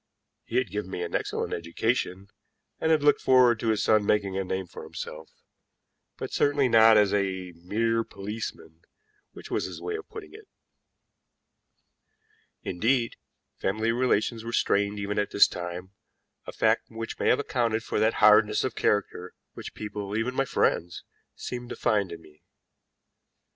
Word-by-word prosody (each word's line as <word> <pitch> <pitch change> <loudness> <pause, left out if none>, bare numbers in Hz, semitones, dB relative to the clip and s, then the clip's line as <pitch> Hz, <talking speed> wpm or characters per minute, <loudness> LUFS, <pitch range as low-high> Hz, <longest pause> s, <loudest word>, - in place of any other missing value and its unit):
He 115 - -7
had 125 -8 0
given 105 -2 -4
me 90 - -4
an 85 - -6
excellent - - -2
education, 95 +2 -2 0.5
and 160 - 0
had 155 -2 +3
looked 145 - +4
forward 125 -3 +5
to 115 - -3
his 110 -2 +1
son 110 -1 +4
making 100 -2 +1
a 95 - -1
name 95 0 -3
for 85 - -11
himself, 80 +1 -8 0.9
but - - -6
certainly 145 -2 +2
not 115 -2 +6
as 105 -2 +3
a 95 -2 -1
mere 115 +7 -1
policeman, 100 -6 -7 0.5
which - - -11
was - - 0
his - - -7
way 435 - -4
of 430 - -8
putting 430 -3 -10
it. 430 -1 -13 2.2
Indeed, 115 +6 0 0.4
family 110 +4 0
relations 115 -2 0
were 115 0 -6
strained 100 -2 +1
even 100 0 -2
at 105 - -1
this 100 - +6
time, 90 +1 -6 0.6
a - - -5
fact - - +1
which 115 0 -7
may - - 0
have - - +4
accounted 115 -5 -1
for - - -2
that 110 +1 +2
hardness 105 0 +5
of 130 - -2
character 95 -3 -1 0.2
which - - -9
people, 105 -1 -5
even 115 +3 -1
my 135 +1 0
friends, 85 -8 0 0.3
seemed 120 -1 -6
to - - -5
find 105 -5 0
in 80 -1 -9
me. 75 -1 -20
105 Hz, 160 wpm, -27 LUFS, 95-120 Hz, 2.2 s, not